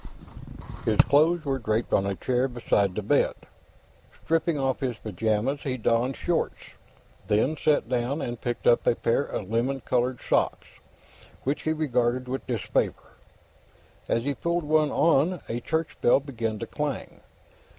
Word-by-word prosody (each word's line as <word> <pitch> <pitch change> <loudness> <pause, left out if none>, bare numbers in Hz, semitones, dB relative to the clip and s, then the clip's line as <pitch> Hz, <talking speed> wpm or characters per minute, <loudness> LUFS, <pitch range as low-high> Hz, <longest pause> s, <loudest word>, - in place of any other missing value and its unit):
His 110 -2 +1
clothes 155 +6 +3
were 135 -1 0
draped 110 0 -1
on 95 - +3
a 100 - -1
chair 125 +5 0
beside 105 -6 0
the 105 - -2
bed. 140 +8 +2 0.9
Stripping 165 0 +1
off 135 -2 0
his 125 -4 -2
pajamas, 110 +6 -1
he 130 -2 -2
donned 120 +3 +1
shorts, 175 -2 -2 0.6
then 110 +9 +2
sat 150 -4 +1
down 125 +4 -1
and 120 -4 -4
picked 120 -1 -3
up 120 - +4
a - - +4
pair 115 - +1
of 105 -7 -5
lemon 125 +4 0
colored 125 0 0
socks, - - 0 0.8
which 140 +3 -1
he 155 - 0
regarded 125 -5 0
with 130 +1 -4
disfavor. 120 -7 -1 1.0
As 115 - +1
he 140 +2 0
pulled 170 +5 -1
one 155 0 +3
on, 165 +4 +2
a 115 - -2
church 160 +4 -2
bell 120 - +5
began 115 -6 -3
to - - -4
clang. - - -4
125 Hz, 150 wpm, -26 LUFS, 115-145 Hz, 1.0 s, bell